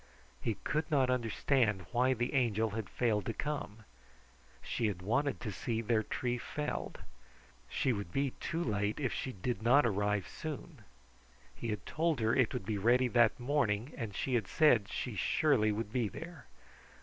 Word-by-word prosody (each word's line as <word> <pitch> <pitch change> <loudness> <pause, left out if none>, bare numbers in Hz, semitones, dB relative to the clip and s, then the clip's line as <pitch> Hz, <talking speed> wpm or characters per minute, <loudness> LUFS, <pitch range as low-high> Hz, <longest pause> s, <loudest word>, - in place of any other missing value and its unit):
He 115 - -1
could 155 +1 -1
not 135 -4 +3
understand 115 -4 +1
why 125 +2 +3
the 120 +3 -2
Angel 115 -5 +2
had 105 -3 -4
failed 110 -3 +1
to 115 - -2
come. 140 -7 -4 0.8
She 115 - -1
had 90 -4 -4
wanted 140 +8 +1
to 105 - -3
see 110 +4 -2
their 115 -1 +2
tree 125 +2 -2
felled. 150 +4 -4 0.7
She 130 - +1
would 100 -5 -5
be 135 +3 0
too 170 +1 -2
late 105 -1 -1
if 130 -4 -1
she 130 - -3
did 105 +1 -3
not 125 +5 +5
arrive 105 -2 0
soon. 155 -1 -7 0.8
He - - -5
had 105 -2 -3
told 160 -2 0
her 110 0 +2
it 130 -4 +3
would 125 -7 -4
be 105 -1 -1
ready 125 +4 +4
that 120 -1 +4
morning, 125 -2 0
and 110 -5 -5
she 130 - -2
had 115 -5 +1
said 125 -10 +4
she 125 -2 -4
surely 110 - +3
would 105 0 -3
be 120 -4 +1
there. 165 - -9
120 Hz, 175 wpm, -33 LUFS, 105-130 Hz, 0.8 s, not